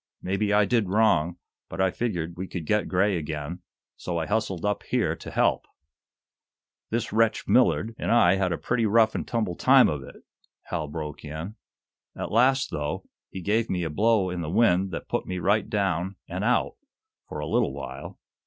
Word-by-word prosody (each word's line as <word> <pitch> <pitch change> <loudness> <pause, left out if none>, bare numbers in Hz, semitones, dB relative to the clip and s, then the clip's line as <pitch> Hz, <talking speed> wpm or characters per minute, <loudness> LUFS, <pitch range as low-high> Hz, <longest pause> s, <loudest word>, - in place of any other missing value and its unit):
Maybe 100 +3 -1
I 105 0 +4
did 115 -4 +1
wrong, 90 -5 +2 0.3
but - - -7
I 95 -1 +3
figured 90 -8 -3
we 95 +2 -5
could 90 -4 -6
get 105 +5 +1
Gray 95 +1 +2
again, 75 +2 -5 0.3
so 85 -1 -4
I 80 - -1
hustled 105 -3 -1
up 105 0 0
here - - 0
to - - -9
help." - - +1 1.2
"This 115 -2 -2
wretch, 115 0 +2
Millard, 115 -2 +3
and - - -2
I 120 - +5
had 95 -2 0
a 85 - -1
pretty 115 -2 0
rough 110 +1 +4
and - - -4
tumble 110 -7 -1
time - - +6
of 75 -2 -2
it," 65 - -13 0.4
Hal 80 -4 -4
broke 75 0 -6
in. 80 +7 -6 0.6
"At - - -5
last, 130 +4 +3
though, 75 0 -4 0.2
he 95 - -7
gave 110 +5 0
me 90 -1 -1
a 80 - -3
blow 105 +1 +2
in 90 -1 -3
the 75 - -4
wind 95 -1 +3
that 85 - -6
put - - -2
me 90 - -3
right 100 +4 +1
down 95 -2 -1
and 90 +3 -4
out, 125 +3 +1 0.5
for - - -6
a - - -3
little - - +1
while. - - -8
95 Hz, 190 wpm, -26 LUFS, 85-110 Hz, 1.2 s, time